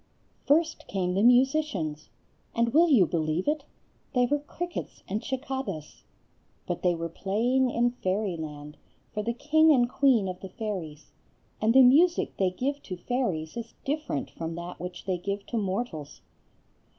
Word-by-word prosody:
First 315 +3 +2
came 180 -2 -1
the 195 - +1
musicians; 245 - +2 0.5
and 235 0 +1
will 335 +3 +6
you 235 - +6
believe 160 - -1
it?—they 290 -3 -2
were 290 +4 +1
crickets 345 +4 -6
and 205 +3 -3
cicadas. 265 - -5 0.6
But 175 - -3
they 180 -1 +2
were 165 0 -3
playing 235 +9 +1
in 240 0 +2
Fairyland, 165 -9 -3 0.4
for 210 - -1
the 235 +3 -1
king 315 +4 +4
and 245 -4 +4
queen 245 -6 +3
of 180 -1 -5
the 190 - -8
fairies; 180 -8 -6 0.5
and 220 +1 +4
the 265 - +9
music 325 +8 +4
they 190 -2 +2
give 275 +10 -3
to 185 - -7
fairies 175 -8 -2
is 235 -1 -7
different 290 - -2
from 165 0 -5
that 170 +1 -7
which 180 0 -7
they 185 -2 -1
give 200 +2 -3
to 235 - -3
mortals. 190 -7 -4
215 Hz, 150 wpm, -27 LUFS, 180-265 Hz, 0.6 s, the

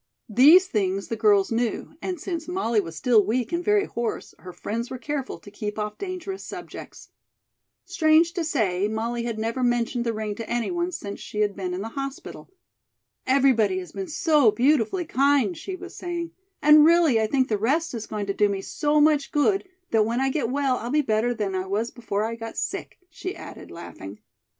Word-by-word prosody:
These 295 - +7
things 195 - -1
the 230 - -1
girls 205 -2 +3
knew, 230 +4 -2
and 365 -3 -4
since 330 -1 -4
Molly 355 - 0
was 165 -3 -8
still 230 -1 +4
weak 235 +4 -1
and 345 +1 -1
very 415 0 +3
hoarse, 235 -1 -4
her 180 - -9
friends 225 +7 -4
were 260 - -5
careful 275 +2 -4
to 205 - -14
keep 210 0 -5
off 210 0 -4
dangerous 380 0 -5
subjects. - - -9 0.8
Strange 320 +1 +3
to 350 - -2
say, 210 - 0
Molly 230 +2 -2
had 230 -2 -3
never 230 +4 -2
mentioned 240 0 +1
the 235 - 0
ring 215 -1 -3
to 225 +2 -7
any 240 +4 -1
one 350 +1 -1
since 200 - -6
she 210 - -4
had 205 -2 +1
been 185 -2 -4
in 185 - -4
the 225 - -5
hospital. 275 +2 -7 0.8
"Everybody 255 -8 +3
has 180 -1 -6
been 385 - -5
so 305 - +3
beautifully 280 - +2
kind," 285 +4 +2
she 370 +3 -6
was 370 0 -10
saying, 345 -1 -4 0.3
"and 300 0 +8
really, 320 -8 +5
I 220 - +1
think 260 +2 +1
the 210 -2 -1
rest 300 +9 0
is 225 -2 -5
going 210 -1 -3
to 200 - -2
do 205 +1 +2
me 195 -1 -3
so 300 +6 +1
much 295 -1 +3
good, 385 +6 +1 0.2
that 220 -1 +4
when 230 +3 -1
I 270 0 +1
get 260 -5 -1
well 270 -1 +1
I'll 235 - -5
be 300 +3 +2
better 220 0 +1
than 205 -4 -2
I 185 0 -2
was 215 +5 -1
before 215 -4 -3
I 230 - -3
got 225 0 -7
sick," - - -4
she 370 +4 -6
added, - - -10
laughing. 100 - -9
240 Hz, 200 wpm, -25 LUFS, 215-305 Hz, 0.8 s, and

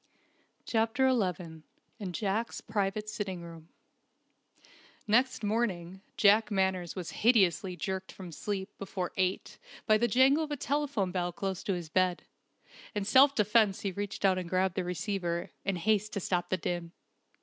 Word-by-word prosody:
CHAPTER 230 +4 +2
XI 180 -8 -2 0.4
IN 195 -4 -4
JACK'S 215 +4 -2
PRIVATE 210 0 -2
SITTING 195 -5 -4
ROOM 165 -1 -11 1.4
Next 245 +2 +2
morning 195 -4 -1 0.2
Jack 215 +2 +5
Manners 190 -4 0
was 180 -3 -5
hideously 195 -5 +3
jerked 190 +3 -4
from 185 -3 -9
sleep 190 +3 -4
before 185 -2 -4
eight 185 0 -1 0.3
by 215 -2 +4
the 240 - +3
jangle 265 +6 +4
of 305 - -5
a 295 - -2
telephone 275 -9 -1
bell 175 -1 -1
close 190 +1 -3
to 195 - +1
his 170 -3 -6
bed. 185 +1 +1 0.7
In 205 -1 -1
self 270 +6 +6
defence 210 -2 +3
he 200 - -2
reached 200 +1 -4
out 190 -1 +4
and 175 -2 -6
grabbed 185 0 +1
the 185 - -2
receiver, 175 -1 -3
in 195 - -1
haste 210 +3 +1
to 200 - -1
stop 175 -1 -1
the 185 - +1
din. 175 -2 -4
195 Hz, 155 wpm, -30 LUFS, 180-215 Hz, 1.4 s, self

